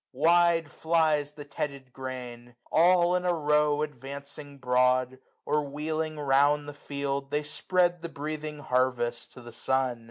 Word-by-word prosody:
360 170 Hz, +3 st, +4 dB
Wide 145 Hz, -, -18 dB
flies 155 Hz, -3 st, +1 dB
the 150 Hz, -1 st, -8 dB
tedded 140 Hz, -2 st, -5 dB
grain; 125 Hz, -2 st, -7 dB, 0.2 s
all 175 Hz, +1 st, +5 dB
in 180 Hz, -, 0 dB
a 180 Hz, -1 st, +1 dB
row 150 Hz, -1 st, +2 dB
Advancing 140 Hz, +1 st, -7 dB
broad, 125 Hz, 0 st, +2 dB, 0.3 s
or 150 Hz, +1 st, +1 dB
wheeling 155 Hz, +2 st, -3 dB
round 145 Hz, +1 st, +3 dB
the 145 Hz, -, -6 dB
field. 140 Hz, -1 st, -4 dB
They 150 Hz, +1 st, 0 dB
spread 175 Hz, +3 st, +1 dB
the 170 Hz, -, -5 dB
breathing 155 Hz, 0 st, -5 dB
harvest 125 Hz, -3 st, 0 dB
to 125 Hz, -, -11 dB
the 120 Hz, 0 st, -10 dB
sun. 125 Hz, +1 st, 0 dB
145 Hz, 150 wpm, -28 LUFS, 130-155 Hz, 0.3 s, all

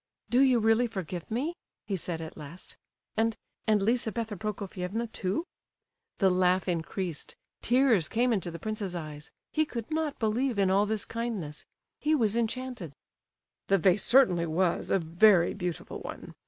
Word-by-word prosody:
"Do 245 Hz, -, +4 dB
you 260 Hz, -3 st, +5 dB
really 225 Hz, +2 st, +3 dB
forgive 185 Hz, -5 st, -5 dB
me?" 270 Hz, +10 st, -1 dB, 0.3 s
he 200 Hz, -, -2 dB
said 170 Hz, -2 st, -3 dB
at 160 Hz, -, -7 dB
last. 155 Hz, +4 st, -10 dB, 0.4 s
"And—and 220 Hz, -1 st, 0 dB
Lizabetha 225 Hz, -1 st, 0 dB
Prokofievna 200 Hz, +1 st, -3 dB
too?" 200 Hz, -, -2 dB, 0.7 s
The 190 Hz, -2 st, +4 dB
laugh 180 Hz, +1 st, +2 dB
increased, 175 Hz, -1 st, -3 dB, 0.3 s
tears 240 Hz, -, +3 dB
came 240 Hz, +2 st, +2 dB
into 190 Hz, -5 st, -1 dB
the 170 Hz, -, -6 dB
prince's 210 Hz, -2 st, -3 dB
eyes, 150 Hz, -3 st, -7 dB, 0.2 s
he 310 Hz, -, +2 dB
could 235 Hz, -5 st, -6 dB
not 310 Hz, -2 st, -1 dB
believe 235 Hz, +2 st, 0 dB
in 195 Hz, -1 st, +3 dB
all 200 Hz, +2 st, +3 dB
this 215 Hz, -1 st, -2 dB
kindness—he 230 Hz, -, -4 dB
was 225 Hz, -6 st, +2 dB
enchanted. 235 Hz, -, -3 dB, 0.7 s
"The 195 Hz, -, +4 dB
vase 190 Hz, +2 st, +3 dB
certainly 185 Hz, -11 st, +4 dB
was 170 Hz, +2 st, 0 dB
a -, -, +4 dB
very 175 Hz, +2 st, +4 dB
beautiful 180 Hz, -4 st, -4 dB
one. -, -, -8 dB
205 Hz, 145 wpm, -29 LUFS, 180-235 Hz, 0.7 s, you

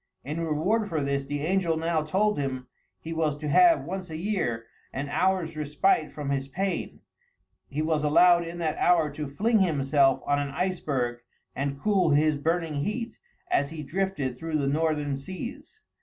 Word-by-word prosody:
In 150 Hz, +4 st, -4 dB
reward 180 Hz, +8 st, 0 dB
for 160 Hz, -, -1 dB
this, 140 Hz, 0 st, -1 dB
the 145 Hz, +1 st, -3 dB
angel 170 Hz, 0 st, +1 dB
now 165 Hz, 0 st, 0 dB
told 195 Hz, +5 st, +1 dB
him, 130 Hz, -2 st, -3 dB, 0.3 s
he 165 Hz, -, -6 dB
was 155 Hz, -3 st, 0 dB
to 150 Hz, 0 st, -5 dB
have, 335 Hz, -, +5 dB
once 185 Hz, 0 st, -5 dB
a 160 Hz, -, -5 dB
year, 160 Hz, -, -2 dB, 0.3 s
an 140 Hz, +2 st, -4 dB
hour's 180 Hz, -1 st, 0 dB
respite 155 Hz, +3 st, +1 dB
from 145 Hz, -2 st, -4 dB
his 135 Hz, -1 st, -1 dB
pain; 190 Hz, +7 st, -3 dB, 0.7 s
he 150 Hz, +2 st, -2 dB
was 155 Hz, -1 st, 0 dB
allowed 170 Hz, +3 st, +5 dB
in 170 Hz, +1 st, -7 dB
that 160 Hz, -3 st, -2 dB
hour 165 Hz, -4 st, +3 dB
to 150 Hz, +1 st, -5 dB
fling 215 Hz, +11 st, +1 dB
himself 140 Hz, -6 st, +3 dB
on 145 Hz, 0 st, +2 dB
an 145 Hz, 0 st, -2 dB
iceberg 140 Hz, -7 st, -1 dB, 0.4 s
and 140 Hz, 0 st, -2 dB
cool 195 Hz, -2 st, +2 dB
his 150 Hz, +1 st, +3 dB
burning 160 Hz, -1 st, -1 dB
heat 230 Hz, +5 st, -4 dB, 0.3 s
as 140 Hz, -, +2 dB
he 160 Hz, -1 st, -6 dB
drifted 150 Hz, -4 st, -2 dB
through 160 Hz, +4 st, -2 dB
the 140 Hz, -, 0 dB
northern 150 Hz, -1 st, 0 dB
seas. 235 Hz, -, -8 dB
155 Hz, 170 wpm, -27 LUFS, 145-180 Hz, 0.7 s, have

